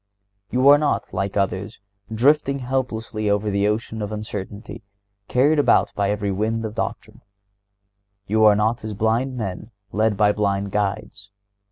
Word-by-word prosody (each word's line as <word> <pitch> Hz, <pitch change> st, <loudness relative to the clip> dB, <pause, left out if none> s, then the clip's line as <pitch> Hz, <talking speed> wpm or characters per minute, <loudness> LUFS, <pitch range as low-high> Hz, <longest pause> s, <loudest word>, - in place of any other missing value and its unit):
(130) 125 Hz, -, -2 dB
You 130 Hz, +2 st, +5 dB
are 145 Hz, -, +5 dB
not, 150 Hz, -1 st, -1 dB
like 100 Hz, 0 st, -2 dB
others, 100 Hz, +2 st, -2 dB, 0.3 s
drifting 140 Hz, +4 st, +2 dB
helplessly 120 Hz, -5 st, -2 dB
over 105 Hz, +1 st, 0 dB
the 100 Hz, +1 st, +1 dB
ocean 110 Hz, +1 st, -2 dB
of 105 Hz, 0 st, -4 dB
uncertainty 105 Hz, -1 st, -6 dB
and 100 Hz, 0 st, -49 dB
"carried 145 Hz, +5 st, +3 dB
about 145 Hz, -, +3 dB
by 100 Hz, -1 st, 0 dB
every 105 Hz, -1 st, -1 dB
wind 110 Hz, +3 st, -1 dB
of 105 Hz, -, -5 dB
doctrine." -, -, -5 dB, 1.0 s
You 110 Hz, +2 st, +2 dB
are 105 Hz, -1 st, +7 dB
not 110 Hz, +3 st, 0 dB
as 110 Hz, -1 st, -5 dB
"blind 115 Hz, +5 st, 0 dB
men 105 Hz, -1 st, -5 dB, 0.2 s
led 110 Hz, -1 st, +1 dB
by 105 Hz, 0 st, +4 dB
blind 100 Hz, -1 st, -1 dB
guides." 100 Hz, 0 st, -3 dB
105 Hz, 160 wpm, -22 LUFS, 100-115 Hz, 1.0 s, are